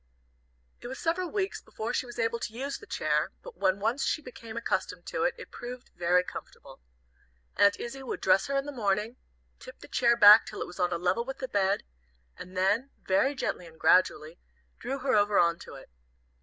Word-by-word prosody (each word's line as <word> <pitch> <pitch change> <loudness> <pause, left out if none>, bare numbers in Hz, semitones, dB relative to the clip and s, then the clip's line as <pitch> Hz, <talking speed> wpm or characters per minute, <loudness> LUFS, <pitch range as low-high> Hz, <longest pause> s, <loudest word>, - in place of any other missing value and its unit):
It - - -7
was 260 +2 -6
several 345 +2 -1
weeks 395 0 -2
before 225 +3 -5
she 255 - -1
was 240 - -10
able 230 0 0
to 220 - -5
use 275 +3 -4
the 430 - -14
chair, - - 0
but - - -10
when 190 +1 +1
once 230 +7 0
she 270 - 0
became 235 -5 -10
accustomed 185 -6 -2
to - - -3
it, 265 - +1
it - - -11
proved 245 +1 -9
very 180 +1 +3
comfortable. - - -10 0.7
Aunt 200 0 +4
Izzie 255 +3 -6
would 265 - -5
dress 190 +8 +3
her 275 0 0
in 275 - -1
the 290 - -5
morning, 215 -1 -1 0.4
tip - - -12
the - - -13
chair 235 -1 +3
back 210 0 +9
till - - -7
it - - -2
was 175 +1 -12
on 180 0 +1
a 170 - 0
level 180 +6 0
with 270 +2 -6
the 260 - -4
bed, 200 -3 +1 0.5
and 185 +1 -10
then, 205 +8 +2 0.2
very 265 +9 +2
gently 180 -8 -3
and 160 -1 -17
gradually, 160 -3 +3 0.4
draw 265 +4 -3
her 265 -1 -1
over 205 -1 +3
on 170 0 +3
to - - -11
it. - - -13
230 Hz, 210 wpm, -29 LUFS, 190-265 Hz, 0.7 s, back